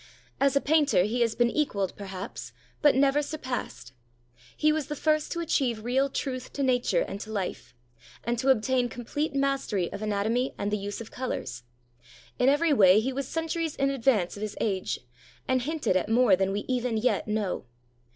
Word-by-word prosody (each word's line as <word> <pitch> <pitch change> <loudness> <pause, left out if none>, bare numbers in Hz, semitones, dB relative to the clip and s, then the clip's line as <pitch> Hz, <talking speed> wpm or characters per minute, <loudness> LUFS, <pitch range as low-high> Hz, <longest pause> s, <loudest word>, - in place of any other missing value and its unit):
As 275 0 +3
a 280 - +4
painter 295 - +3
he 230 +5 -1
has 230 -2 +2
been 240 -1 +2
equaled, 200 - -1
perhaps, 195 -1 -7 0.3
but 295 -3 +5
never 275 +2 +3
sur 310 +2 -5
passed. 245 - -5 0.6
He 305 - +4
was 305 -2 -1
the 295 - -4
first 305 +1 +1
to 340 - -2
achieve 245 -9 0
real 265 +4 +1
truth 255 -2 -4
to 280 - -2
nature 255 - +2
and 200 - -6
to 220 - -7
life, 195 - -4 0.5
and 235 0 -1
to 265 +2 +1
obtain 250 0 +2
complete 280 +6 -3
mastery 275 -10 0
of 200 - -6
anatomy 215 +4 0
and 205 +1 -2
the 210 - +1
use 205 +2 -5
of 225 - -9
colors. 125 - -4 0.8
In 250 - +5
every 295 +2 +3
way 195 -5 +6
he 260 +4 -2
was 275 0 -3
centuries 325 0 -2
in 275 0 +1
advance 230 -9 +1
of 205 - -9
his 215 -1 -4
age, 195 -4 -1 0.5
and 260 -1 +2
hinted 300 - -1
at 185 - +1
more 230 -3 +5
than 190 +1 0
we 205 +1 -1
even 250 -2 -1
yet 215 -2 +1
know. 210 -7 -2
250 Hz, 190 wpm, -27 LUFS, 210-275 Hz, 0.8 s, way